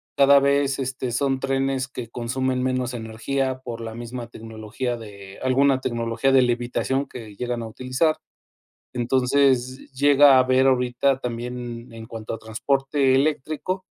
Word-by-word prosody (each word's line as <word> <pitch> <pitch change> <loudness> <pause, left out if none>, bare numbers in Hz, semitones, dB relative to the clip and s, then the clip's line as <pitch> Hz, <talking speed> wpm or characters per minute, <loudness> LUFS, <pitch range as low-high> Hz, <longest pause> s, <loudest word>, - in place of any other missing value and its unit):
cada 140 0 +6
vez 140 0 +1
este 130 -1 -3
son 135 +2 0
trenes 135 0 -1
que 125 -3 -7
consumen 125 +2 -2
menos 130 -1 -1
energía 130 +4 -2
por 120 -3 -7
la 110 -1 -6
misma 120 +1 -7
tecnología 110 +2 -5
de 100 -4 -11
alguna 130 +1 +3
tecnología 115 +1 0
de 130 -1 +6
levitación 125 +3 -1
que 110 -4 -10
llegan 120 +1 -3
a 115 - -5
utilizar. 130 +7 0 0.8
Entonces 130 +1 +1
llega 140 0 +6
a - - +5
ver 130 +1 +3
ahorita 130 +1 +2
también 120 -1 -6
en 115 0 -9
cuanto 115 -1 -6
a - - -5
transporte 135 +4 0
eléctrico, 155 +6 -1
130 Hz, 140 wpm, -23 LUFS, 120-135 Hz, 0.8 s, cada